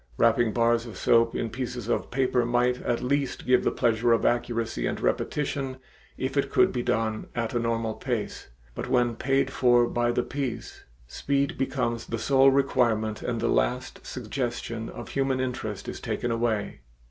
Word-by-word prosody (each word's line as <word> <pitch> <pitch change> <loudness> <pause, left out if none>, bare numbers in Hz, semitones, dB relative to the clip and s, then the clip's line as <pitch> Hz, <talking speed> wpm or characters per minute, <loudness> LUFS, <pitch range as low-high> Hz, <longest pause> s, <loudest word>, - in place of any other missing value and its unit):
Wrapping 115 0 +3
bars 115 +1 +2
of 105 -5 -9
soap 115 0 +3
in 115 - -2
pieces 125 -2 -4
of 120 - -1
paper 130 -1 +1
might 120 +1 +1
at 120 +1 -1
least 140 0 -1
give 125 0 +4
the - - +3
pleasure 115 0 +2
of 115 - +1
accuracy 115 - 0
and - - -3
repetition 135 -2 -1 0.4
if 130 +1 -3
it 140 -1 +1
could - - +4
be 125 - -1
done 115 -3 -1
at 120 +1 -2
a 120 - +1
normal 115 -1 -1
pace, 115 -4 -4 0.3
but - - -5
when 120 -2 +2
paid 135 +3 +1
for 120 -2 +4
by 120 0 0
the 120 - 0
piece, 135 -3 -5 0.2
speed 140 - -1
becomes 120 -4 -2
the 115 - -2
sole 135 +3 +5
requirement 120 -5 +1
and 120 -2 -2
the 115 - +1
last - - 0
suggestion 120 -3 -4
of - - -8
human 135 -1 0
interest 120 -5 -3
is - - -5
taken 120 - -2
away. 115 -3 -1
120 Hz, 170 wpm, -26 LUFS, 115-130 Hz, 0.4 s, sole